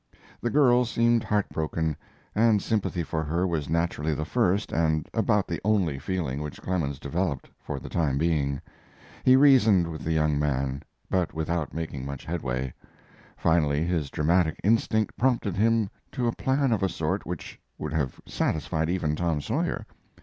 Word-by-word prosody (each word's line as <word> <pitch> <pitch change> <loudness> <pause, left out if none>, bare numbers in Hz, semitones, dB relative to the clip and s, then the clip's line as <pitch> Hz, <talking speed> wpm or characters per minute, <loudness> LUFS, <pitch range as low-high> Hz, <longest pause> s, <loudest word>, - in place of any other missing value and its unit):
The 120 - 0
girl 125 -3 +5
seemed 115 -1 +2
heartbroken, 80 -6 -1 0.4
and 110 -1 +4
sympathy 95 -4 -1
for 80 0 -2
her 85 +4 0
was 80 -5 -2
naturally 80 -2 0
the 75 - -3
first 105 0 +1
and 80 -2 +1
about 105 -3 +2
the 85 - -3
only 95 -9 +1
feeling 75 -4 -2
which 75 -1 -6
Clemens 80 -7 -2
developed, 70 0 -2
for - - -5
the - - -9
time 75 -6 0
being. 70 -3 +1 0.6
He 130 - +7
reasoned 115 -10 +6
with 80 -2 -7
the 80 - -1
young 75 -2 +2
man, 70 -2 -1 0.3
but 90 -4 0
without 80 0 -1
making 80 -5 -4
much 70 0 -6
headway. 65 -6 -3 0.6
Finally 75 -2 +2
his 85 -5 -1
dramatic 80 +3 +1
instinct 110 0 +2
prompted 120 -6 +1
him 110 +1 +3 0.3
to 125 -3 -1
a 115 - +1
plan 135 0 +1
of 110 - +1
a 95 - +2
sort 85 +3 -2
which 90 -2 -6 0.2
would 75 0 -4
have 70 -5 -1
satisfied 80 +1 -1
even 85 -4 0
Tom 85 -2 0
Sawyer. - - -2
85 Hz, 160 wpm, -27 LUFS, 75-105 Hz, 0.6 s, He